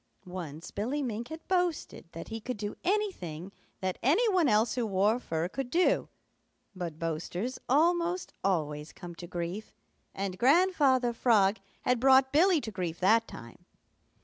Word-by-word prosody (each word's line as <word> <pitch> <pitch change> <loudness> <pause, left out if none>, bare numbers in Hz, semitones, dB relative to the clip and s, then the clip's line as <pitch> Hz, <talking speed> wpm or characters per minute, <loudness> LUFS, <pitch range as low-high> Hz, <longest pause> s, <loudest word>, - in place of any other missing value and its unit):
Once 170 -3 -7
Billy 255 +8 -2
Mink 235 -1 -4
had 320 +1 -9
boasted 360 - -1
that 165 - -8
he 225 - -4
could 250 +2 -4
do 205 0 -4
anything 265 - -2 0.3
that 185 -1 -2
any 335 - +3
one 345 -6 +3
else 215 +2 +3
who 245 - -1
wore 210 +2 +2
fur 165 -7 -2
could 265 +6 -5
do, 355 +6 +2 0.7
but 170 -4 -5
boasters 170 +9 -3
almost 340 +5 +2
always 150 -5 -1
come 175 -2 -9
to 175 +1 -9
grief, 175 +4 -5 0.4
and 190 -1 -4
Grandfather 275 -4 +4
Frog 220 -4 +3 0.3
had 250 -1 +2
brought 265 +1 +5
Billy 345 +2 +5
to 225 - -6
grief 175 -4 -4
that 225 +5 +4
time. 115 0 -11
225 Hz, 150 wpm, -30 LUFS, 180-280 Hz, 0.7 s, brought